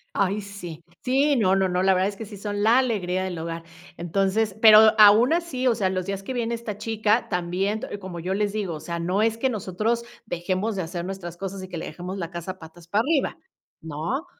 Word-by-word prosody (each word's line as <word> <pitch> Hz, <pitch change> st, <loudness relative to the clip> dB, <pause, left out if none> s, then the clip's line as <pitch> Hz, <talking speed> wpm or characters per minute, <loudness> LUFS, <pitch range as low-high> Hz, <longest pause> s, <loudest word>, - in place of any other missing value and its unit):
¡Ay, 200 Hz, +2 st, +1 dB
sí! 180 Hz, -5 st, -9 dB, 0.2 s
Sí, 275 Hz, +3 st, +3 dB
no, 190 Hz, -5 st, +3 dB
no, 190 Hz, -1 st, +2 dB
no. 180 Hz, +1 st, 0 dB
La 190 Hz, 0 st, +5 dB
verdad 185 Hz, +2 st, +2 dB
es 205 Hz, -, -8 dB
que 225 Hz, -, -7 dB
sí 205 Hz, 0 st, -10 dB
son 205 Hz, 0 st, -3 dB
la 230 Hz, +4 st, +5 dB
alegría 185 Hz, -7 st, 0 dB
del 180 Hz, -3 st, -4 dB
hogar. 165 Hz, 0 st, -5 dB, 0.3 s
Entonces 195 Hz, +4 st, 0 dB
pero, 220 Hz, -1 st, +8 dB
aun 215 Hz, +7 st, +7 dB
así, 290 Hz, -7 st, -1 dB
o 235 Hz, -, +3 dB
sea, 200 Hz, -4 st, 0 dB
los 185 Hz, -1 st, -2 dB
días 195 Hz, 0 st, -3 dB
que 260 Hz, -, -5 dB
viene 235 Hz, -1 st, -1 dB
esta 225 Hz, -3 st, -6 dB
chica, 220 Hz, +1 st, 0 dB
también, 185 Hz, +3 st, -1 dB
te 205 Hz, -, -6 dB
como 185 Hz, -3 st, -7 dB
yo 185 Hz, +3 st, -2 dB
les 205 Hz, 0 st, 0 dB
digo: 200 Hz, -5 st, -3 dB
"O -, -, -7 dB
sea, 170 Hz, +2 st, -5 dB
no 180 Hz, +5 st, 0 dB
es 225 Hz, 0 st, +1 dB
que 265 Hz, +3 st, +1 dB
nosotros 215 Hz, +2 st, -1 dB, 0.2 s
dejemos 185 Hz, +3 st, -2 dB
de 190 Hz, -, -1 dB
hacer 175 Hz, +1 st, -5 dB
nuestras 180 Hz, -3 st, -6 dB
cosas 195 Hz, 0 st, -5 dB
y 185 Hz, -, -9 dB
que 175 Hz, -, -6 dB
le -, -, -5 dB
dejemos 180 Hz, +4 st, -6 dB
la 170 Hz, -1 st, -5 dB
casa 175 Hz, +2 st, -6 dB
patas 165 Hz, 0 st, -14 dB
para 205 Hz, +4 st, +2 dB
arriba", 285 Hz, +2 st, 0 dB, 0.4 s
¿no? 165 Hz, -, -3 dB
195 Hz, 230 wpm, -24 LUFS, 180-220 Hz, 0.4 s, pero